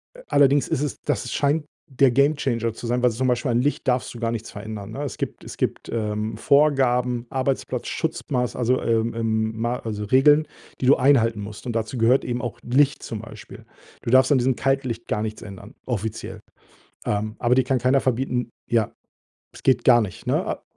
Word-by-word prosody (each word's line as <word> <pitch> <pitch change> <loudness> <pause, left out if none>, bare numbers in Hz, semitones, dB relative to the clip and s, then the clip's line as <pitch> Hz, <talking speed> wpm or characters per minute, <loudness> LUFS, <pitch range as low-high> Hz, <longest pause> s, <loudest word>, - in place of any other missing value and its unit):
a - - -13
allerdings 140 0 +4
ist 135 - -1
es 150 - -3
das 120 - -2
scheint 150 +2 +1 0.3
der 130 -1 +4
Gamechanger 135 -4 +1
zu 120 - -9
sein, 120 +1 0
weil 125 - +4
zum 130 +4 -1
Beispiel 125 0 0
an 120 +1 +2
Licht 145 0 -1
darfst 125 0 0
du 120 - -9
gar 115 -1 -1
nichts 115 -1 -5
verändern, 105 -1 -7
ne? 140 +5 -5
Es 140 - -5
gibt - - -5
es - - -9
gibt, - - -2
ähm, 105 -1 -2
Vorgaben, 125 -3 +2
Arbeitsplatzschutzmaß 130 0 -2
also, 125 +1 +1
ähm, 115 0 +1
ähm, 110 -1 -1
ma 120 +2 -1
also, 105 -2 -5
Regeln, 145 +6 +5 0.3
die - - 0
du 135 - +7
einhalten 115 -5 +3
musst 105 +4 -8
und 120 - -3
dazu 115 +3 -2
gehört 120 +4 +3
eben 120 0 -3
auch 120 -4 -5
Licht 140 +4 +2
zum 110 - -5
Beispiel. 110 -2 -12 0.4
Du 115 - -2
darfst 130 +2 +5
an 140 - +5
diesem 125 0 +1
Kaltlicht 130 -4 -1
gar 105 - -1
nichts 110 0 -5
ändern, 100 +4 -10
offiziell. 110 -2 -4 0.6
Ähm, 105 +1 -2
aber 120 0 +2
dir 130 - +4
kann 130 +1 +1
keiner 130 +2 +3
verbieten 125 -1 -1 0.2
ja. 115 -3 +1 0.6
Es - - -13
geht 130 - +2
gar 120 -2 +7
nicht, 95 -5 -5
ne, - - 0
a - - -4
120 Hz, 195 wpm, -23 LUFS, 110-130 Hz, 0.6 s, du